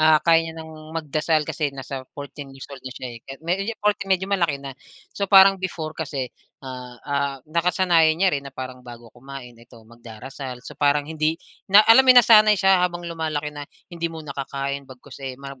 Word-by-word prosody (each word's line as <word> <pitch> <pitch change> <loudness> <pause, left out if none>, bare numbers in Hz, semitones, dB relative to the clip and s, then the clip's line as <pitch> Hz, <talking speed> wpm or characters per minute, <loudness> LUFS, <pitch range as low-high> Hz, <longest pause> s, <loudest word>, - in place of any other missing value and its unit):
ah, 155 0 +6
kaya 165 -1 +5
niya 160 - -8
ng 160 0 -9 0.3
magdasal 155 0 0
kasi 150 0 -2
nasa 135 -1 -8
14 145 0 -8
years 135 0 -11
old 135 - -9
na 130 - -7
siya, 130 - -6
eh, 115 - -10
kahit 135 +2 -9
medyo 195 +6 -1
14, 210 -2 -1
medyo 190 0 +2
malaki 175 -7 0
na. 140 -1 -8 0.4
So 200 -1 -3
parang 195 -1 +7
before 160 -4 -4
kasi, 140 -5 -5 0.3
ah, 125 -1 -8
ah, 140 -1 -1
nakasanayan 170 0 +2
niya 190 0 +2
rin 140 -1 -2
na - - -17
parang 130 -1 -7
bago 120 -2 -13
kumain, 130 -1 -10
ito 115 -1 -18
magdarasal. 120 +3 -10
So - - -9
parang 145 0 +3
hindi 155 +1 -1 0.3
na 205 +2 +7
alam 225 +3 +8
mo - - -2
yung 245 - +9
nasanay 215 -2 +6
siya 190 -1 +4
habang 175 -1 -3
lumalaki 155 -3 -3
na 145 -1 -7 0.3
hindi 170 0 -3
muna 160 -3 -8
kakain 140 0 -5
bagkus, 130 +2 -13
eh, 130 -2 -6
mag 135 -1 -10
150 Hz, 200 wpm, -23 LUFS, 135-170 Hz, 0.4 s, yung